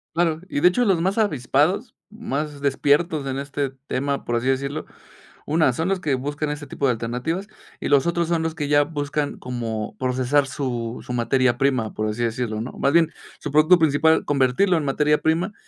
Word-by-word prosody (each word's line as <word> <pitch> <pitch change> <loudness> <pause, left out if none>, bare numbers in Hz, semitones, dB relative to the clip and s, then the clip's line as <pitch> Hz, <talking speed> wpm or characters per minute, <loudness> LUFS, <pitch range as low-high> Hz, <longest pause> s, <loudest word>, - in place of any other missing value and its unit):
Claro, 165 -2 +1
y 145 - -2
de 180 - +7
hecho 245 +7 +1
los 185 -5 +2
más 190 +4 0
avispados, 185 - +1 0.2
más 150 - -4
despiertos 145 +2 +1
en 135 0 -2
este 140 -1 -3 0.2
tema, 140 +1 -1
por 120 0 -1
así 125 +3 -2
decirlo, 140 +3 -1 0.6
una, 155 -3 +3
son 160 +8 -2
los 195 -1 0
que 145 -6 0
buscan 145 +3 -3
ese 150 0 -5
tipo 140 - -5
de 130 - +4
alternativas, 125 - -3 0.3
y - - -2
los 140 0 +4
otros 170 -1 0
son 170 -1 +1
los 160 0 -2
que 145 -3 -3
ya 145 0 +5
buscan 145 -1 -3
como 115 -4 -4
procesar 130 +2 +1
su 125 -4 -3
su 125 - -6
materia 120 +1 +2
prima, 130 -5 0
por 110 0 -2
así 120 +2 -2
decirlo, 115 -2 -2
¿no?, 120 - -5
más 140 - 0
bien, 165 -1 +4 0.3
su 150 - -5
producto 155 +5 +5
principal, 160 0 +3
convertirlo 140 +7 +2
en 155 - -1
materia 150 +2 +2
prima 170 +6 0
145 Hz, 195 wpm, -23 LUFS, 130-160 Hz, 0.6 s, de